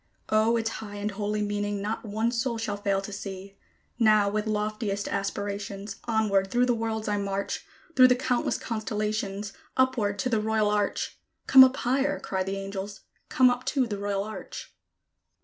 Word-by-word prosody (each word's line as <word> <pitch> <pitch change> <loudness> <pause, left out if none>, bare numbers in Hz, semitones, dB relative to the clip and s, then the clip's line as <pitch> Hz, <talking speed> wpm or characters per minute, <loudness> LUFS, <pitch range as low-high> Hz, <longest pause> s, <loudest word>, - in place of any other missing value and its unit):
O, 220 +2 +3
its 225 0 -1
high 205 -2 -8
and 205 +1 -2
holy 210 +1 -2
meaning 205 0 -2
not 210 +3 -3
one 220 +2 -1
soul 235 0 -1
shall 215 -2 -2
fail 200 -1 0
to 205 - -7
see! 195 0 -7 0.4
Now, 215 -3 +5
with 215 +1 -1
loftiest 210 -1 -2
aspirations, 200 0 -4
onward 215 -4 +2
through 245 +3 +3
the 245 - +2
worlds 225 -1 -2
I 205 0 +1
march, 200 0 -2 0.3
Through 255 -1 +8
the 250 - +4
countless 250 -1 0
constellations, 210 -3 -3 0.2
upward 235 -6 +2
to 255 - -1
the 225 -3 +1
Royal 215 -1 +1
Arch. 205 -1 -1 0.3
"Come 265 0 +10
up 260 +1 +3
higher!" 270 +3 +1
cry 190 -1 -2
the 195 +1 -2
angels: 195 0 -6 0.3
"come 255 -1 +5
up 245 +1 -3
to 270 -3 +1
the 205 -4 -4
Royal 200 -1 -1
Arch." 215 +1 -8
210 Hz, 170 wpm, -27 LUFS, 200-230 Hz, 0.4 s, Come